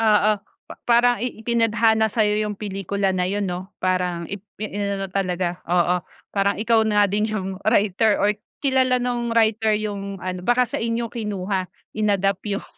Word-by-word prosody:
Oo, 215 -1 +4 0.4
pa - - -9
parang 245 +1 +4
i 250 -2 -3
itinadhana 225 -1 +2
sa'yo 210 -1 +2
yung 210 -2 -5
pelikula 195 -1 -2
na 180 - 0
yun 205 0 -1
'no? 180 +2 -5
Parang 180 -2 -1
ip 200 -1 -5 0.2
i - - -1
inano 200 -1 -2
talaga 180 -2 -1
oo, 180 0 +3 0.4
parang 200 0 +2
ikaw 225 +1 +3
na 210 -1 +4
din 210 +2 +1
yung 190 -3 -3
writer, 215 -1 +3
or 210 +1 +2 0.3
kilala 260 -2 +3
nung 245 -1 -1
writer 220 -1 +3
yung 200 -2 -4
ano, 185 -1 -4
baka 245 +5 +3
sa - - -3
inyo 230 0 -1
kinuha, 200 -5 -2 0.3
in-adapt 200 -3 +1 0.2
yung - - -12
210 Hz, 165 wpm, -22 LUFS, 195-225 Hz, 0.4 s, Oo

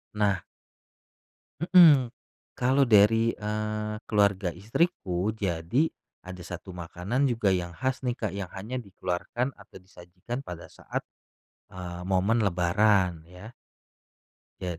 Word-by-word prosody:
Nah 100 -3 +2 1.2
Mhm. 155 -9 +7 0.5
Kalau 130 +3 +3
dari, 115 +1 +5
eee, 105 0 -3
keluarga 100 -3 +2
istriku, 100 - -1
jadi 95 - 0 0.4
ada 90 -1 -8
1 90 +2 -8
makanan 90 +10 -2
juga 115 -4 +1
yang 90 -1 -2
khas 130 +4 -2
nih, 120 - +1
Kak, 105 -5 -2
yang 100 -3 -4
hanya 110 +7 -5
dikeluarkan 100 +4 -3
atau 100 0 -17
disajikan 90 +6 -8
pada 90 -9 -8
saat, - - -5 0.7
eee, 90 -1 -7
momen 95 +5 +2
lebaran 90 -1 +2
ya. 90 +6 -12 1.1
Jad 90 -2 -4
100 Hz, 115 wpm, -27 LUFS, 90-115 Hz, 1.2 s, Mhm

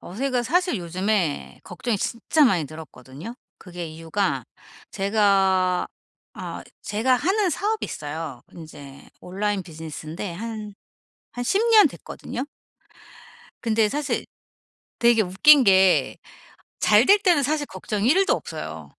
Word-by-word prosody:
어 175 - -11
제가 255 +2 -1
사실 355 +4 +1
요즘에 180 -1 -2
걱정이 210 +5 -3
진짜 260 +9 +1
많이 185 - +2
늘었거든요. 155 - -10 0.2
그게 175 -2 -8
이유가 165 +5 -2 0.5
제가 195 -3 +2 0.5
아 - - -7 0.2
제가 225 +5 +1
하는 380 - +1
사업이 420 +8 -1
있어요. 150 -4 -6
인제 145 -4 -12
온라인 200 +2 -2
비즈니스인데 160 +2 -7
한, 215 +2 -7 0.6
한 245 - -4
10 390 - +1
년 435 -2 +8
됐거든요. 255 - -7 1.2
근데 220 -2 +2
사실 290 +4 -2 0.7
되게 235 -2 +4
웃긴 250 +9 +5
게 190 -2 +4 0.7
잘 215 +3 +5
될 405 - +7
때는 360 -7 +3
사실 295 +2 -1
걱정이 215 -5 -3
1 380 +7 +4
도 - - +4
없어요. - - -7
205 Hz, 245 characters per minute, -23 LUFS, 175-255 Hz, 1.2 s, 년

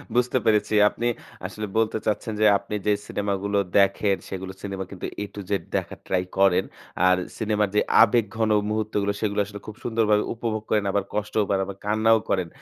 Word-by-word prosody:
বুঝতে 125 +1 +2
পেরেছি। 110 0 +2 0.2
আপনি 120 - -3 0.4
আসলে 105 0 -5
বলতে 110 0 +2
চাচ্ছেন 110 +1 -1
যে 110 - +5
আপনি 100 +2 -6
যে 105 - +5
সিনেমাগুলো 100 0 -1 0.2
দেখেন, 100 0 +3
সেগুলো 95 0 -5
সিনেমা 95 -1 -4
কিন্তু 100 - -6 0.2
এ - - -3
টু - - -6
জেড 100 -4 0
দেখার - - -3
ট্রাই 90 -1 +1
করেন, 95 -2 +4 0.4
আর 90 0 +5 0.2
সিনেমার 105 -2 0
যে - - +5 0.2
আবেগঘন 110 -1 +1 0.2
মুহূর্তগুলো 105 -1 -1
সেগুলো 105 -1 0
আসলে 100 0 -9
খুব 110 - -7
সুন্দরভাবে 110 -3 +2
উপভোগ 110 -2 -3
করেন, 105 -1 +2
আবার 100 0 +1
কষ্টও 105 +1 0
পান, 100 -1 +2
আবার 100 0 -8
কান্নাও 110 +2 +4
করেন। 90 -3 +1
105 Hz, 175 wpm, -24 LUFS, 100-110 Hz, 0.4 s, যে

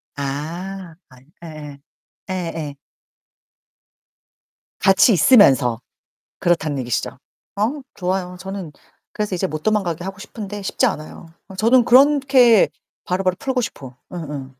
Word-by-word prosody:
아. 165 +6 -5
아니 130 0 -19 0.2
예예. 150 -3 -9 0.5
예 - - -2
예. 165 -5 -4 2.0
같이 195 +3 +5
있으면서 135 - +5 0.6
그렇다는 160 -5 0
얘기시죠? 125 0 -2 0.5
어 255 +8 -1
좋아요. 180 -1 -3
저는 190 -4 -7 0.4
그래서 210 -3 -2
이제 190 +2 -1
못 155 -2 -6
도망가게 180 -6 0
하고 195 +1 -7
싶은데 205 -1 -7
쉽지 225 +6 0
않아요. 165 -5 -4 0.2
어 190 - -10
저는 235 +4 +4
그렇게 265 -4 +5 0.4
바로바로 185 0 0
풀고 260 -2 -1
싶어. 135 - -7 0.2
음음. 150 -6 -6
185 Hz, 260 characters per minute, -20 LUFS, 155-210 Hz, 2.0 s, 같이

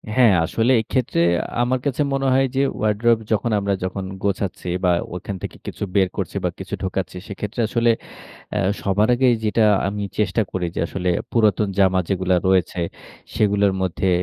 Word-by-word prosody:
হ্যাঁ, 120 -5 +6
আসলে 115 +9 +1
এইক্ষেত্রে 120 -3 -1 0.2
আ - - -6 0.2
আমার 125 +1 0
কাছে 140 0 0
মনে 135 0 0
হয় 135 +1 +4
যে, 135 - +3 0.2
wardrobe 110 +2 +2
যখন 110 +2 +1
আমরা 100 0 0
যখন 95 +1 -3 0.2
গোছাচ্ছি 100 -2 -2 0.2
বা, 90 - +4 0.2
ওইখান 95 +2 -5
থেকে - - -6
কিছু - - -5
বের 95 -2 +4
করছি 100 -2 -3
বা, 90 - +1
কিছু 95 +1 -8
ঢুকাচ্ছি, 95 0 -3
সেইক্ষেত্রে 105 +4 -4
আসলে 115 +1 +2 0.6
অ্যা - - 0 0.2
সবার 100 +2 +2
আগেই 125 0 +4
যেইটা 110 +1 +2 0.2
আমি 100 +1 -3 0.2
চেষ্টা 105 +2 +1
করি 95 -1 -2
যে, - - -2
আসলে 90 0 -2 0.2
পুরাতন 105 -2 +3
জামা 95 -1 +4
যেগুলো 95 -1 +1
রয়েছে, 95 -1 +2 0.5
সেগুলোর 100 -2 +2
মধ্যে 95 +1 0
100 Hz, 170 wpm, -21 LUFS, 95-115 Hz, 0.6 s, হ্যাঁ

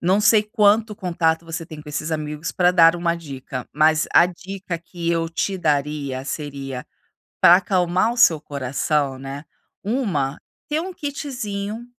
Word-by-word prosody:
não 185 +4 +2
sei 210 0 +5
quanto 210 0 +2
contato 170 -5 0
você 165 0 -5
tem 155 -2 -9
com 150 - -12
esses 155 +2 -3
amigos, 150 0 -4
para 180 -1 +3
dar 165 -2 +6
1 170 -1 0
dica, 135 -5 -7
mas 155 +1 +3
a 170 - +7
dica 185 0 -6
que 170 0 -4
eu 165 -1 0
te 190 +3 -1
daria 145 -4 -1
seria, 140 -3 -5 0.5
para 175 - +8
acalmar 185 +2 +1
o - - -7
seu 165 -8 +6
coração, 140 0 -1
né, 135 +2 -7 0.4
1, 190 - -1 0.3
ter 305 +1 0
1 370 +2 -5
kitzinho, 240 - -5
170 Hz, 155 wpm, -22 LUFS, 150-200 Hz, 0.5 s, para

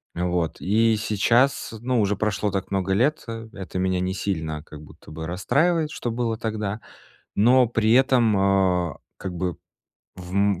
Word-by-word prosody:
вот. 90 -2 -1
И 110 +3 +3
сейчас, 115 +6 +1
ну, 125 -1 +1
уже 105 0 +1
прошло 105 0 -1
так 95 0 -3
много 95 0 0
лет, 135 +9 +1 0.3
это 95 -2 -6
меня 95 0 +1
не 90 +1 -1
сильно 80 -6 -3
как 75 -2 -12
будто 75 - -15
бы 80 +1 -6
расстраивает, 150 - +1
что 120 - -4
было 115 -1 -1
тогда. 110 -2 -3 0.6
Но 125 +4 +5
при 115 -2 +2
этом, 125 -5 +4 0.5
э, - - -9 0.2
как 95 - -5
бы 90 0 -2 0.6
в, 90 -1 -10
м, 100 -2 +2
100 Hz, 160 wpm, -24 LUFS, 90-120 Hz, 0.6 s, Но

